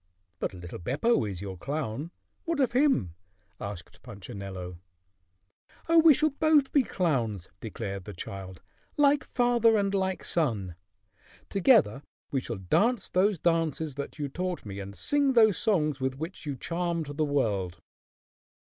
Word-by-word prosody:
"But -, -, -3 dB
little 90 Hz, -1 st, -8 dB
Beppo 140 Hz, -, +1 dB
is 95 Hz, -1 st, -6 dB
your 95 Hz, -2 st, -6 dB
clown. 140 Hz, -, -3 dB, 0.4 s
What 335 Hz, -3 st, -1 dB
of 260 Hz, -4 st, +2 dB
him?" 245 Hz, -, +2 dB, 0.5 s
asked 100 Hz, -4 st, -8 dB
Punchinello. 95 Hz, -2 st, -8 dB, 1.1 s
"Oh, 330 Hz, 0 st, +6 dB
we 320 Hz, -3 st, +7 dB
shall 310 Hz, 0 st, +2 dB
both 295 Hz, -1 st, +3 dB
be 285 Hz, -, +5 dB
clowns!" 125 Hz, -, -1 dB
declared 100 Hz, -4 st, -5 dB
the 105 Hz, -, -7 dB
child, 95 Hz, 0 st, -8 dB, 0.3 s
"like 290 Hz, 0 st, +4 dB
father 240 Hz, -2 st, +3 dB
and 200 Hz, -1 st, 0 dB
like 190 Hz, -1 st, -1 dB
son. 110 Hz, -, 0 dB, 0.8 s
Together 200 Hz, -, +4 dB, 0.3 s
we 135 Hz, -, 0 dB
shall 115 Hz, -3 st, -5 dB
dance 200 Hz, -, +1 dB
those 195 Hz, +2 st, +2 dB
dances 160 Hz, -2 st, 0 dB
that 140 Hz, +3 st, -6 dB
you 145 Hz, -2 st, -2 dB
taught 180 Hz, +3 st, -4 dB
me 100 Hz, -1 st, -6 dB
and 100 Hz, 0 st, -7 dB
sing 285 Hz, -, +1 dB
those 220 Hz, -6 st, +5 dB
songs 155 Hz, -10 st, +1 dB
with 130 Hz, 0 st, -2 dB
which 160 Hz, +1 st, -7 dB
you 140 Hz, -, -2 dB
charmed 170 Hz, -1 st, -3 dB
the 155 Hz, -, +1 dB
world." 105 Hz, -11 st, 0 dB
150 Hz, 145 wpm, -28 LUFS, -, 1.1 s, we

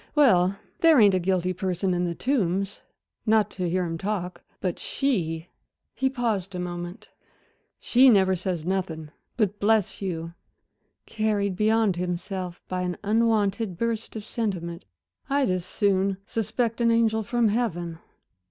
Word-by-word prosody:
"Well, 200 Hz, -, +4 dB, 0.2 s
there 325 Hz, -4 st, +6 dB
ain't 205 Hz, -3 st, +6 dB
a 185 Hz, -, +3 dB
guilty 185 Hz, 0 st, 0 dB
person 185 Hz, 0 st, -1 dB
in 175 Hz, 0 st, 0 dB
The 170 Hz, -1 st, -2 dB
Tombs 200 Hz, -6 st, -1 dB, 0.5 s
not 215 Hz, -1 st, +3 dB
to 180 Hz, -2 st, -2 dB
hear 180 Hz, +1 st, +1 dB
them 165 Hz, -1 st, -3 dB
talk; 190 Hz, -2 st, -3 dB, 0.2 s
but 180 Hz, -3 st, -2 dB
she" 170 Hz, -, -1 dB, 0.5 s
he 265 Hz, +3 st, +1 dB
paused 220 Hz, -7 st, -2 dB
a -, -, -3 dB
moment. 175 Hz, 0 st, -6 dB, 0.7 s
"She 260 Hz, +2 st, +5 dB
never 190 Hz, -4 st, +4 dB
says 175 Hz, -3 st, -3 dB
nothing; 170 Hz, -5 st, -2 dB, 0.3 s
but 205 Hz, -3 st, 0 dB
bless 210 Hz, -2 st, +2 dB
you" 165 Hz, -3 st, -4 dB, 0.7 s
carried 210 Hz, -3 st, 0 dB
beyond 215 Hz, -2 st, +2 dB
himself 180 Hz, 0 st, -4 dB
by 185 Hz, 0 st, -2 dB
an 180 Hz, -1 st, -2 dB
unwonted 215 Hz, -3 st, +1 dB
burst 230 Hz, 0 st, -2 dB
of 215 Hz, -2 st, -6 dB
sentiment 180 Hz, -7 st, -3 dB, 0.4 s
"I'd 275 Hz, -6 st, +2 dB
as 180 Hz, -1 st, -1 dB
soon 195 Hz, -1 st, +1 dB
suspect 225 Hz, +2 st, -1 dB
an 235 Hz, -, +4 dB
angel 225 Hz, -1 st, +3 dB
from 230 Hz, +1 st, +1 dB
heaven." 175 Hz, -7 st, -2 dB
195 Hz, 145 wpm, -26 LUFS, 180-225 Hz, 0.7 s, there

